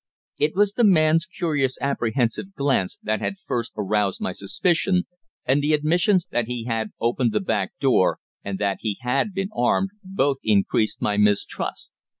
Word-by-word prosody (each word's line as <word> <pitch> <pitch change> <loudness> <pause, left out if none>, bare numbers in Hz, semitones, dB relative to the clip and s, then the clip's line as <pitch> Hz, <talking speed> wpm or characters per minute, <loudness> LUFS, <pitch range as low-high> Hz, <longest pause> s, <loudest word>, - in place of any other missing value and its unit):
It 150 +2 +1
was 205 +1 +3
the 240 - +1
man's 165 -3 +4
curious 150 -10 -1
apprehensive 130 - -1
glance 135 -10 0
that 110 0 -1
had 195 - -2
first 120 - -3
aroused 105 -1 0
my - - -2
suspicion, 180 - 0 0.4
and 135 +3 +2
the 150 +2 +1
admissions 175 +5 +2
that 120 -2 0
he 120 -1 -4
had 110 -2 -2
opened 120 0 +1
the 105 - +2
back 100 -1 -1
door, 130 -9 +3 0.3
and 100 -1 -4
that 100 -1 0
he 105 -3 -2
had 130 - 0
been 195 0 -3
armed, 190 +10 +1
both 185 -8 0
increased 105 +1 +1
my 105 -1 +1
mistrust. 105 -1 0
130 Hz, 160 wpm, -23 LUFS, 110-170 Hz, 0.4 s, man's